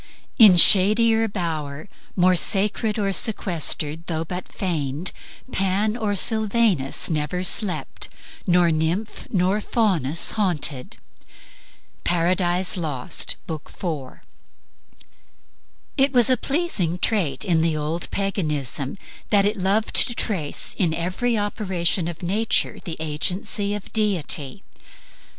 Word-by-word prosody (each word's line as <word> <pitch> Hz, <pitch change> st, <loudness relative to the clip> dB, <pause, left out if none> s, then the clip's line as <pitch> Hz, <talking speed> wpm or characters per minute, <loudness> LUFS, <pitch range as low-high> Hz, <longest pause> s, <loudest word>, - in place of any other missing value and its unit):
In 205 Hz, -6 st, +8 dB
shadier 220 Hz, +5 st, +6 dB
bower, 160 Hz, -6 st, -4 dB, 0.3 s
More 185 Hz, 0 st, +3 dB
sacred 210 Hz, +4 st, 0 dB
or 200 Hz, -2 st, -1 dB
sequestered, 170 Hz, -6 st, 0 dB
though 160 Hz, -1 st, -3 dB
but 180 Hz, +2 st, -7 dB
feigned, 155 Hz, -3 st, -3 dB, 0.4 s
Pan 195 Hz, +3 st, 0 dB
or 215 Hz, -4 st, -2 dB
Sylvanus 215 Hz, -, +1 dB
never 155 Hz, +3 st, -2 dB
slept, 180 Hz, -6 st, 0 dB, 0.4 s
nor 175 Hz, -1 st, +3 dB
nymph 165 Hz, +7 st, -2 dB
Nor 190 Hz, +2 st, 0 dB
Faunus 175 Hz, -, 0 dB
haunted." 160 Hz, -, -1 dB, 1.1 s
Paradise 175 Hz, +1 st, 0 dB
Lost, 150 Hz, -7 st, -1 dB
B. 170 Hz, -, -5 dB
IV. 155 Hz, -3 st, -7 dB, 1.8 s
It 270 Hz, 0 st, +3 dB
was 245 Hz, -2 st, +4 dB
a -, -, +5 dB
pleasing 255 Hz, -, -1 dB
trait 185 Hz, -3 st, -1 dB
in 170 Hz, -4 st, +2 dB
the 160 Hz, -1 st, 0 dB
old 155 Hz, +3 st, -4 dB
Paganism 150 Hz, -, -2 dB, 0.3 s
that 200 Hz, -2 st, +4 dB
it 210 Hz, +2 st, +1 dB
loved 195 Hz, +4 st, 0 dB
to 240 Hz, -, -5 dB
trace 170 Hz, -12 st, -2 dB
in 170 Hz, -5 st, +1 dB
every 185 Hz, +8 st, -1 dB
operation 190 Hz, -4 st, -1 dB
of 170 Hz, +1 st, -7 dB
nature 210 Hz, +6 st, 0 dB
the 165 Hz, -5 st, -5 dB
agency 180 Hz, +6 st, -2 dB
of 210 Hz, -, -9 dB
deity. 195 Hz, -6 st, -1 dB
180 Hz, 110 wpm, -22 LUFS, 160-210 Hz, 1.8 s, In